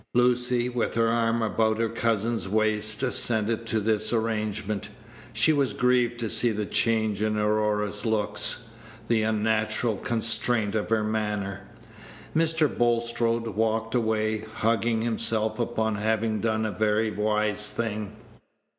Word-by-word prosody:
Lucy, 125 0 +2
with 125 -1 -2
her 115 0 +2
arm 115 0 +1
about 110 +1 +1
her 115 0 +1
cousin's 115 -2 -1
waist, 110 +1 0
assented 115 -3 +1
to 110 - 0
this 110 0 0
arrangement. 110 -2 -2 0.4
She 115 +8 +3
was 140 -3 +1
grieved 125 -1 +1
to 115 - -1
see 120 +2 +2
the 105 -1 -2
change 110 -2 0
in 110 0 0
Aurora's 105 -1 0
looks, 110 +2 -1 0.4
the 115 -2 +2
unnatural 110 0 0
constraint 110 -1 +1
of 110 -1 -2
her 110 -1 +2
manner. 105 -3 -3 0.7
Mr. 160 -1 +2
Bulstrode 115 -1 0
walked 110 +1 -1
away, 110 -2 0
hugging 110 +1 0
himself 110 -1 0
upon 110 -2 -1
having 110 +1 0
done 110 0 0
a 110 - -2
very 110 +2 +1
wise 105 0 0
thing. 105 -2 -4
110 Hz, 130 wpm, -26 LUFS, 105-115 Hz, 0.7 s, She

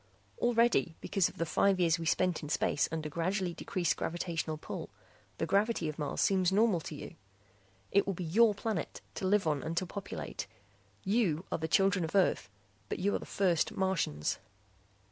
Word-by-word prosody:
Already, 235 -8 +3
because 195 -3 +1
of - - -16
the 165 - 0
five 190 +4 +2
years 170 -2 +3
we 165 - -3
spent 180 +1 +1
in 150 - -7
space 145 - +1
under 160 -1 -3
gradually 175 +4 -1
decreased 175 -1 -1
gravitational 165 -2 -2
pull, - - -6 0.5
the - - 0
gravity 205 -3 +1
of 155 0 -5
Mars 145 - -2
seems 185 -2 +3
normal 205 -2 +3
to 155 -1 -7
you. - - -8 0.8
"It 200 - +3
will 195 - -1
be 180 - -4
your 210 +6 +4
planet, 205 -5 -3
to 190 - -2
live 205 0 +3
on 150 -3 +1
and 165 +1 -4
to 185 - +1
populate. 195 +2 -6 0.6
You 195 -5 +1
are - - -1
the 160 - -2
children 195 +2 +3
of 160 +4 -4
Earth 185 - +2 0.4
but - - -2
you 200 +3 +1
are - - 0
the - - -10
first 180 -5 +1
Martians." 180 - 0
180 Hz, 185 wpm, -32 LUFS, 160-200 Hz, 0.8 s, your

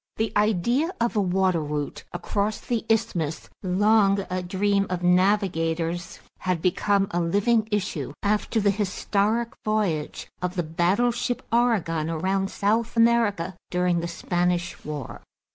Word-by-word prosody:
The 220 -1 -1
idea 220 - +2
of 235 0 0
a 210 - +3
water 185 -2 +2
route 150 -1 -4
across 205 +4 -2
the 235 -2 -2
isthmus, 175 -9 -1
long 200 +1 +3
a 185 0 -1
dream 200 +2 0
of 180 -1 -3
navigators, 175 -3 +1 0.2
had 185 -2 -1
become 195 +3 +1
a 175 - 0
living 205 +6 +2
issue 205 -2 -2
after 210 +2 +1
the 205 -1 +3
historic 210 +3 0
voyage 200 -9 -1
of 180 +1 -2
the 175 - 0
battleship 195 +10 0
Oregon 200 -10 +1
around 190 +4 0
South 225 +4 0
America 230 -6 +2
during 180 -1 +1
the 170 - -3
Spanish 175 +1 -1
War. 150 -2 -6
195 Hz, 130 wpm, -25 LUFS, 175-215 Hz, 0.2 s, a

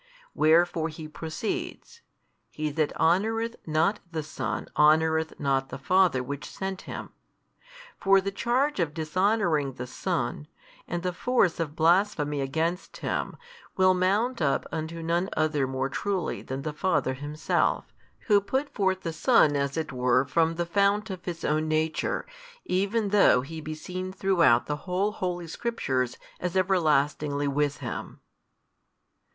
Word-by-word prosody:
Wherefore 165 +1 +3
He 155 0 -8
proceeds, 160 - -5 0.5
He 155 0 -3
that 155 0 0
honoureth 225 +8 +2
not 160 +7 +2
the 160 -2 -3
Son 155 - -4
honoureth 160 +1 +3
not 135 -2 0
the - - -6
Father 175 -2 +3
which 140 +2 -6
sent 190 -1 -5
Him. - - -6 0.9
For 195 0 +5
the 195 +1 -3
charge 250 +6 0
of 155 -4 -1
dishonouring 165 -3 +1
the 125 - -6
Son, 125 +3 -3 0.4
and 175 0 -3
the 180 -1 -1
force 205 -4 +1
of 155 -2 -3
blasphemy 165 -4 +2
against 160 +6 -2
Him, - - -3 0.4
will 185 0 +5
mount 200 +6 +1
up 140 -3 +1
unto 165 +1 -4
none 170 +3 0
other 150 -3 +1
more 130 0 -1
truly 185 +4 -2
than 135 +1 -5
the 155 - -3
Father 150 -5 0
Himself, 145 +3 -1 0.3
Who 205 -3 +4
put 265 +8 -2
forth 190 -3 0
the 165 - -4
Son 160 - +4
as 140 +1 -1
it 155 -4 -3
were 125 +1 +2
from 165 +3 +1
the 175 +1 -1
|264 - - -21
Fount 200 +1 +2
of 180 -2 -7
His 170 -2 -4
Own 155 +1 +1
Nature, 155 0 0 0.4
even 200 +3 0
though 195 -11 +5
He 160 +4 -7
be 155 0 -5
seen 185 +4 -5
throughout 180 -11 +3
the 150 - -2
whole 190 +3 +1
Holy 180 -4 -3
Scriptures 135 - -2 0.2
as 180 +1 -2
everlastingly 150 -5 +1
with 145 0 0
Him. - - -6
165 Hz, 145 wpm, -27 LUFS, 150-190 Hz, 0.9 s, For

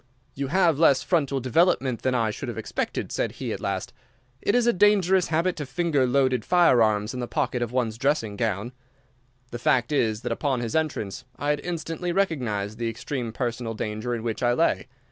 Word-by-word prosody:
"'You 140 0 -3
have 170 -2 +2
less 150 -5 +5
frontal 140 -6 +1
development 130 -1 +2
than 130 -1 0
I 115 -3 +1
should - - -6
have - - -6
expected,' - - -3
said - - -1
he, - - -4
at - - -5
last. - - -3 0.5
'It 205 - +1
is 245 -1 +3
a 240 - +4
dangerous 190 -2 +4
habit 170 +3 +1
to 150 - -4
finger 140 -1 +1
loaded 130 -2 +2
firearms 115 - +3
in 125 - -5
the 120 - -3
pocket 130 -4 -1
of 120 -1 -2
one's 115 -3 -1
dressing 130 -6 0
gown.' 110 +1 -2 0.8
"The 120 - -5
fact 120 +1 +2
is 110 -7 +1
that 120 - -2
upon 135 -4 0
his 115 +2 -3
entrance 135 -7 -2
I 145 +2 -1
had 150 - 0
instantly 170 +1 -4
recognised 120 - -1
the 115 -1 -1
extreme 120 +1 -4
personal 115 -1 -3
danger 110 +3 -3
in 115 - -5
which 115 -2 -3
I 120 0 +3
lay. - - +1
130 Hz, 195 wpm, -25 LUFS, 115-160 Hz, 0.8 s, less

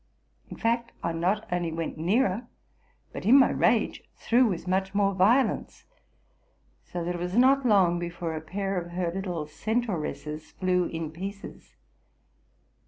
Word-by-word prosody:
In - - -8
fact, 235 +1 0
I 170 - 0
not 185 +6 0
only 175 -2 -1
went 165 0 -4
nearer, 200 +6 +1 0.7
but - - -6
in 240 +7 +7
my 265 - +5
rage - - +1
threw 245 +2 +3
with 180 -3 -3
much 190 +1 0
more 200 -1 +2
violence; 215 +8 +2 1.0
so 175 -1 -5
that 175 +1 -2
it 175 - -5
was 180 +4 -2
not 265 +1 +5
long 185 -5 +4
before 170 -1 -4
a 155 - -4
pair 195 +3 -2
of 170 0 -10
her 175 -1 -1
little 180 -4 -3
centauresses 160 -6 -3
flew 180 -1 +1
in 165 -2 -4
pieces. 195 +5 -8
185 Hz, 150 wpm, -27 LUFS, 170-215 Hz, 1.0 s, in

